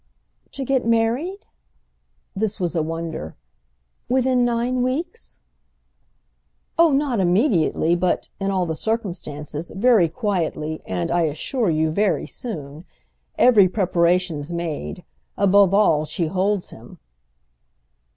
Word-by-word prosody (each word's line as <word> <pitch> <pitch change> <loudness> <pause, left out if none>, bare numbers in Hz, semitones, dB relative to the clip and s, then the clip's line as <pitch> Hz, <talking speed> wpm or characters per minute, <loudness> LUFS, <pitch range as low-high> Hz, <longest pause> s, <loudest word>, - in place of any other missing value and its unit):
"To 270 - -4
get 265 -1 +1
married?"—this 230 - -4
was 175 -1 -2
a 165 - +2
wonder—"within 165 - -3
nine 240 +1 0
weeks?" 310 - -4 1.3
"Oh 335 0 +5
not 275 -5 +1
immediately, 175 - +2
but—in 185 +2 -2
all 190 -2 0
the 160 -1 -3
circumstances—very 180 - 0
quietly 165 -6 -2
and, 90 -2 -2
I 175 -1 +2
assure 190 - -1
you, 160 0 +1
very 190 -3 +1
soon. 155 - -7 0.5
Every 210 -7 +6
preparation's 175 -4 +1
made. 160 - -4 0.3
Above 200 -1 +5
all 180 -7 +3
she 165 +3 -2
holds 190 +3 -1
him." 115 +2 -13
185 Hz, 100 wpm, -22 LUFS, 160-230 Hz, 1.3 s, Every